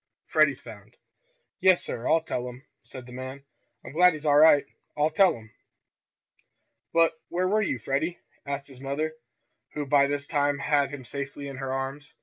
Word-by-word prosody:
Freddie's - - +3
found." - - -13 0.6
"Yes, 185 -1 +4
sir, 115 - -5
I'll 165 0 +3
tell 125 -5 -3
'em," 125 +3 -13 0.2
said 130 -2 -11
the 125 - -13
man. 130 +2 -7 0.4
"I'm - - -8
glad 180 +4 +5
he's 155 0 -8
all 145 -1 +4
right. 150 -2 +7 0.3
I'll 150 +1 +2
tell 190 0 +4
'em!" 110 -1 -15 1.4
"But 165 0 +4 0.2
where 180 +1 0
were 215 +3 +2
you, 205 - -1
Freddie?" 140 +9 -2 0.3
asked 140 0 -4
his 135 -2 -14
mother, 145 +3 -2 0.6
who 150 -1 -2
by 140 0 +4
this 145 0 -2
time 145 -1 +1
had 145 0 +1
him 135 -3 -8
safely 140 +2 -6
in 135 -2 -7
her 135 0 -4
arms. 135 +3 -5
145 Hz, 175 wpm, -27 LUFS, 135-155 Hz, 1.4 s, right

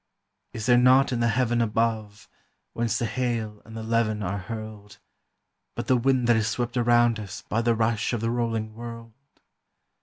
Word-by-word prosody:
Is 110 -1 -5
there 120 -1 +5
naught 130 +2 +5
in 120 - -1
the 115 - +2
heaven 120 0 +1
above, 110 -2 -1 0.5
whence 115 -1 -1
the 120 - -1
hail 115 -3 -2
and 110 0 -10
the 110 - -5
levin 110 -2 0
are 100 +2 -2
hurled, 105 0 -8 0.8
But - - -4
the 130 - +3
wind 130 0 +2
that 120 -1 +4
is 110 -1 0
swept 120 +2 -2
around 120 -2 +3
us 100 -2 -8
by 115 - -1
the 115 0 +2
rush 110 0 0
of 120 - -1
the 115 0 0
rolling 115 -2 -2
world? 115 0 -9
115 Hz, 180 wpm, -25 LUFS, 110-120 Hz, 0.8 s, there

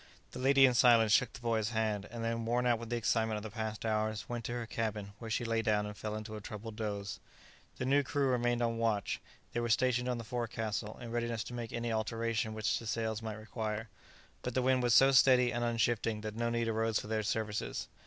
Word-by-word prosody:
The - - -7
lady, 135 +1 +6
in 125 - +4
silence, 115 -3 +6
shook 125 +2 +4
the - - -9
boy's 115 -2 0
hand; 110 -3 -1
and 115 0 -5
then, 115 0 -1
worn 120 +2 +1
out 120 -2 +3
with 115 -1 -7
the 120 - 0
excitement 110 -1 +1
of 105 - -6
the 110 - -6
past 110 -1 -4
hours, 110 -1 -1
went 120 -1 -4
to 120 - -3
her 120 -1 -3
cabin, 110 -3 -3
where 115 - -7
she 120 +2 -1
lay 115 0 +1
down 105 -1 +1
and 105 0 -6
fell 105 +1 -4
into 110 0 -6
a 105 - -7
troubled 105 +2 -7
doze. 100 -3 -4 0.6
The 125 - -2
new 140 +2 +4
crew 140 +1 0
remained 120 -1 +1
on 115 -1 0
watch. 110 -4 0 0.3
They 120 - 0
were 120 0 -1
stationed 125 +1 +2
on 125 - 0
the 115 - -5
forecastle, 110 -2 -3
in 115 -1 -7
readiness 120 -1 -1
to 120 - -8
make 120 -2 -5
any 120 -1 -2
alteration 110 0 -1
which 110 0 0
the 115 - -8
sails 110 0 -1
might 110 -1 -5
require, 110 0 -4 0.5
but 125 - -4
the 130 - +2
wind 130 0 +3
was 120 -1 +3
so 135 +1 +7
steady 125 -2 +5
and 120 0 -1
unshifting 115 -2 0
that 110 0 -5
no 115 +1 0
need 115 0 0
arose 115 0 +1
for - - -7
their 110 0 -1
services. 105 0 -2
115 Hz, 235 wpm, -33 LUFS, 110-120 Hz, 0.6 s, so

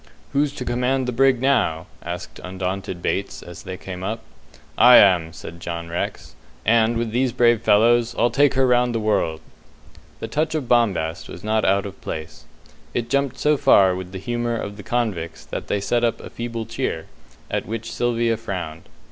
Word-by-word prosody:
"Who's 145 0 +2
to 125 - -6
command 125 +2 0
the - - 0
brig 130 +1 +3
now?" 100 -12 +1 0.2
asked 85 0 -7
undaunted 95 -1 -4
Bates, 100 - -2
as 85 -1 -10
they 95 0 -7
came 90 -1 -7
up. 110 +3 -3 0.5
"I 125 0 +8
am," 90 -5 +6
says 80 - -9
John 85 -1 -5
Rex, 85 - -4 0.3
"and, 115 +1 +3
with 115 -1 -2
these 125 +2 +1
brave 120 -2 +3
fellows, 120 +2 +4
I'll 120 0 +3
take 140 +3 +3
her 135 0 +4
round 125 -1 +3
the - - +1
world." 85 -7 0 0.8
The - - -4
touch 155 +1 -1
of 145 -5 -2
bombast 95 -9 +1
was 90 - -9
not 110 0 +1
out 100 +1 +2
of 100 -1 -9
place. 80 0 -7 0.5
It 120 0 -2
jumped 140 -2 +1
so 150 0 +2
far 100 -10 +5
with 90 0 -7
the 95 - -6
humour 120 +3 -2
of 100 -2 -5
the - - -7
convicts 100 -8 -2
that - - -6
they 100 - 0
set 120 +4 0
up 115 -1 +1
a - - -10
feeble 115 -1 -4
cheer, 115 -8 -3 0.5
at - - -2
which 115 0 -5
Sylvia 120 -1 +1
frowned. 90 -8 -6
115 Hz, 185 wpm, -22 LUFS, 95-120 Hz, 0.8 s, I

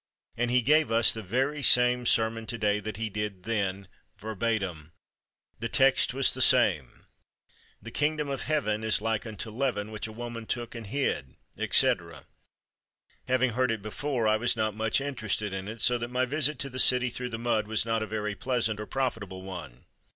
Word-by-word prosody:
And 120 +1 -1
he 125 0 +3
gave 155 +1 +3
us 115 0 +6
the 110 - -5
very 135 +9 -1
same 125 -1 +4
sermon 110 0 +2
to 115 - -4
day 105 -2 +1
that 105 0 -6
he 110 0 -2
did 105 -3 -5
then 100 -3 -2 0.3
verbatim. 95 -7 -3 0.7
The 115 +1 -3
text 135 +1 +4
was 135 +1 +2
the 130 - -2
same 100 - +5 0.8
'The 115 - -8
Kingdom 150 +2 -1
of 135 -1 -3
Heaven 110 -9 -1
is 110 -1 +2
like 110 +1 -2
unto 110 +1 -6
leaven 110 -4 -2
which 110 0 -5
a - - -9
woman 115 0 -7
took 120 -1 -4
and 115 -3 -8
hid,' 100 - -2 0.2
etc. 85 -4 +1 1.0
Having 130 -1 +2
heard 125 +3 0
it 110 -3 -2
before, 120 +2 -2
I 110 0 +3
was 120 +2 0
not 110 -1 -1
much 110 +3 +1
interested 110 -7 -2
in 95 0 -5
it, 110 +1 -7
so 125 -1 +3
that 120 - -3
my 125 +1 0
visit 150 +2 -1
to 140 - -1
the 130 - -4
city 125 -1 +4
through 125 +1 -4
the 115 - -5
mud 115 -2 -1
was 110 0 0
not 115 -1 0
a 110 - -3
very 105 0 -3
pleasant 115 -2 -1
or 105 - -6
profitable 110 -8 -3
one. 85 -10 -9
115 Hz, 190 wpm, -28 LUFS, 105-125 Hz, 1.0 s, us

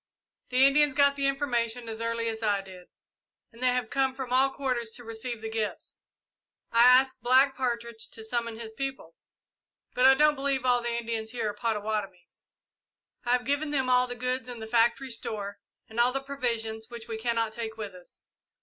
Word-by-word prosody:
The 255 +1 +5
Indians 290 0 +4
got 280 -1 +4
the 275 -1 +1
information 245 -4 -1
as 225 0 -5
early 230 0 -1
as 220 0 -3
I 205 -3 +1
did, 185 -2 -13 0.6
and 230 +1 -16
they 255 - +3
have 250 -2 0
come 265 -1 +1
from 260 -2 -4
all 265 +2 +5
quarters 255 -4 -2
to 245 - -8
receive 230 0 -5
the 220 - -4
gifts. 220 -2 -4 0.7
I 230 - +4
asked 260 +1 +6
Black 260 +3 +4
Partridge 235 -3 -3
to 220 - -10
summon 230 0 -2
his 220 -1 -7
people, 270 -9 -5 0.8
but 250 +1 +5
I 265 - +8
don't 300 +2 +5
believe 270 -2 -1
all 245 -1 +3
the 235 0 -2
Indians 230 -1 -3
here 220 -4 -1
are - - -13
Pottawattomies. 210 -6 -4 0.8
I 240 - +2
have 250 0 +1
given 285 +2 0
them 265 -3 0
all 250 0 +4
the 245 - -5
goods 255 +1 -2
in 245 -2 -7
the 220 - -6
factory 235 +4 +2
store, 205 -3 -5 0.3
and 220 +1 -6
all 245 +1 +5
the 270 - -1
provisions 230 -5 -2
which 235 -1 -9
we 225 -1 -5
cannot 230 -1 0
take 225 -1 -5
with 210 -3 -6
us. 180 -1 -16
240 Hz, 195 wpm, -28 LUFS, 225-260 Hz, 0.8 s, I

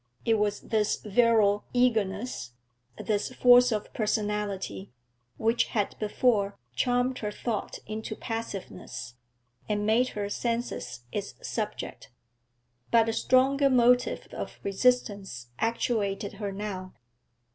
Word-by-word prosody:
It 225 -2 +3
was 205 0 0
this 215 -2 +1
virile 210 -1 +3
eagerness, 220 - 0 0.4
this 210 +2 -1
force 245 0 +7
of 210 -1 -3
personality, 205 - -2 0.5
which 225 +2 +2
had 205 -3 -1
before 210 -2 +1 0.2
charmed 245 - +1
her 210 - -2
thought 220 0 -3
into 215 +1 -5
passiveness, 205 - -6 0.6
and 205 0 0
made 230 +4 +3
her 205 -1 -1
senses 230 - -3
its - - -4
subject; - - -4 0.8
but 225 -1 +4
a - - 0
stronger 275 +4 +3
motive 245 -1 +3
of - - -6
resistance 200 - 0
actuated 215 -3 0
her 200 -1 -2
now. 195 -2 -5
215 Hz, 110 wpm, -28 LUFS, 200-240 Hz, 0.8 s, force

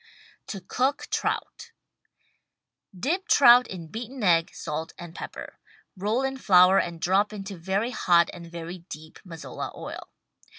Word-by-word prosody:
TO 195 - -6
COOK 260 +9 -1
TROUT - - -3 1.3
Dip 345 - -1
trout 250 -2 +7
in 180 -3 -7
beaten 235 +7 -7
egg, 170 -3 +4
salt 160 +2 -5
and 175 -1 -9
pepper. - - -8 0.4
Roll 210 +7 -1
in 270 0 -2
flour 185 -5 +6
and 170 -1 -3
drop 195 +5 +2
into 200 -1 -7
very 190 +7 -2
hot 170 -7 +3
and 170 -1 -10
very 170 +1 -7
deep 155 +1 -10
Mazola 165 -4 -7
oil. - - -8
190 Hz, 135 wpm, -26 LUFS, 170-235 Hz, 1.3 s, trout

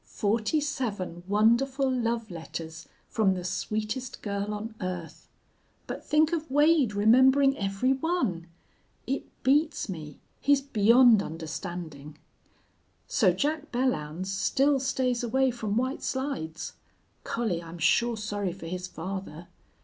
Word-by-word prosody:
Forty 220 +8 0
seven 210 - -3
wonderful 235 +7 +3
love 230 -4 -1
letters 165 -1 -7 0.2
from 195 -4 +2
the 180 - -5
sweetest 215 +7 -3
girl 200 0 -2
on 215 +2 -5
earth! 180 -3 -5 0.6
But - - -6
think 310 +2 +3
of 320 -3 -2
Wade 290 -5 +4
remembering 260 +6 +5
every 195 +5 0
one! 260 - -1 0.6
It 270 +2 -2 0.2
beats 290 -1 +2
me. 155 -5 -7 0.2
He's 285 0 +4
beyond 235 -3 +5
understanding. 160 -2 -6 0.9
"So 190 -5 +3
Jack 300 - -2
Belllounds 185 - -1
still 270 +9 +2
stays 255 -2 0
away 260 +2 +2
from 220 -3 -2
White 260 +3 -1
Slides. 260 - -3 0.5
Collie, 215 -8 -1
I'm 170 0 -9
sure 235 +7 +2
sorry 205 -3 -3
for 185 -2 -10
his 180 +2 -4
father. 180 -2 -7
215 Hz, 120 wpm, -28 LUFS, 180-265 Hz, 0.9 s, remembering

